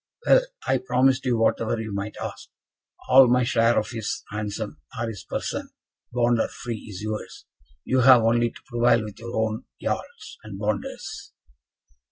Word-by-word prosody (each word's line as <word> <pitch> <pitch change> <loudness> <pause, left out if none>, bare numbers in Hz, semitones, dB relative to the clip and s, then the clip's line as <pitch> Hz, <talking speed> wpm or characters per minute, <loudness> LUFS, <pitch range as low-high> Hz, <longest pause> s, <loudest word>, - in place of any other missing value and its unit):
"Well, - - +6 0.3
I - - +3
promised 135 - +2
you 120 -2 +2
whatever 115 0 +1
you 110 -2 -5
might 100 +2 -4
ask. - - -6 0.6
All 130 0 +8
my 125 +1 +3
share 115 -1 +3
of 110 - 0
his 115 -3 -4
ransom, 105 0 -4 0.2
or 120 - -1
his 105 -5 -6
person, - - -4 0.4
bond 120 -1 +2
or - - +2
free, 120 -4 -7
is 100 0 -7
yours. 110 0 -5 0.4
You 130 - +1
have 125 -2 +7
only 120 +1 +3
to - - -16
prevail 120 -2 +3
with 105 -2 -9
your 120 +1 -6
own 110 0 -1
Jarls - - -5
and 105 -3 -8
Bonders." 105 -1 -4
115 Hz, 165 wpm, -25 LUFS, 110-120 Hz, 0.6 s, All